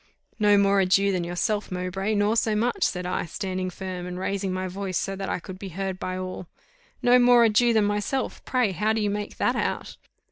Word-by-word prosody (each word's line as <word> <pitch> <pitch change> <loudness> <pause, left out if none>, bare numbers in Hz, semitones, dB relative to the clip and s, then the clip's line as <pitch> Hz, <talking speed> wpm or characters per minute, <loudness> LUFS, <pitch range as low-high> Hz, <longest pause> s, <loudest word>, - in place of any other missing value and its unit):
"No 205 -1 +5
more 200 0 +4
a 190 - +3
Jew 195 +2 +3
than 180 -2 -1
yourself, 185 +5 -2
Mowbray, 185 +3 -2
nor 205 +2 +2
so 220 -2 +1
much," 245 - 0
said 180 -1 -2
I, 180 0 -2
standing 185 +1 -3
firm, 180 -1 -6
and 180 0 -5
raising 195 +1 -2
my 185 0 -2
voice, 185 -1 -3
so 195 - -2
that 195 0 -4
I - - 0
could 185 +1 -9
be 195 - -6
heard 190 +1 -4
by 185 0 -3
all. 185 -1 -6 0.6
"No 245 +1 +6
more 245 -1 +6
a 230 - +5
Jew 235 +3 +4
than 220 -2 +3
myself! 205 +6 -2
pray 250 -6 +1
how 210 +4 0
do 220 - 0
you 205 -1 0
make 205 0 -4
that - - +1
out?" - - -3
195 Hz, 225 wpm, -25 LUFS, 185-210 Hz, 0.6 s, No